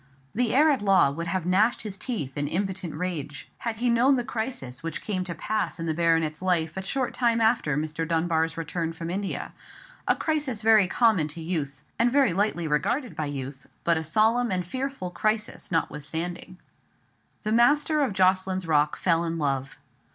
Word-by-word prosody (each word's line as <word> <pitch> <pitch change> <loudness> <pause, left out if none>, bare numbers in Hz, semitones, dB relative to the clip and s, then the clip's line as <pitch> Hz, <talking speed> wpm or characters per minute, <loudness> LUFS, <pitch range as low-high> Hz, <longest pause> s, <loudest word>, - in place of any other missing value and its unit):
The 240 +1 +1
heir 305 +3 +6
at 270 - 0
law 195 -8 +4
would 165 +4 -4
have 170 0 -1
gnashed 205 +7 +2
his 210 -3 -5
teeth 190 - -4
in 145 0 -1
impotent 190 0 -2
rage 155 -6 -5
had 230 -2 -3
he 240 +3 -1
known 245 +4 +4
the 245 - -1
crisis 220 - -4
which 165 -1 -4
came 190 -4 -2
to 170 -2 -5
pass 215 +3 -2
in 165 - -3
the 160 - 0
baronet's 165 -1 +1
life 170 -3 +1
a 190 - -3
short 255 +7 -2
time 235 -2 +2
after 220 - +2
Mr. 155 +1 -2
Dunbar's 165 -1 0
return 165 +1 -3
from 165 +1 -5
India; 195 +2 -3 0.5
a - - +4
crisis 290 -8 -1
very 215 -3 +6
common 215 -7 +3
to 155 +3 -8
youth, 155 -5 -3 0.2
and 240 +1 +3
very 270 -8 +3
lightly 180 -3 0
regarded 240 - 0
by 155 - -2
youth, 135 -1 -6 0.2
but 170 - +3
a 160 - -1
solemn 220 +9 +2
and 180 -1 0
a - - -15
fearful 260 -5 -4
crisis 215 +3 -2
notwithstanding. 165 +3 -3 0.9
The 215 - -1
master 295 +6 +4
of 275 - +1
Jocelyn's 185 -1 +2
Rock 150 -2 +2
fell 170 -2 +2
in 165 0 -2
love. 135 -3 -2
185 Hz, 185 wpm, -26 LUFS, 160-225 Hz, 0.9 s, heir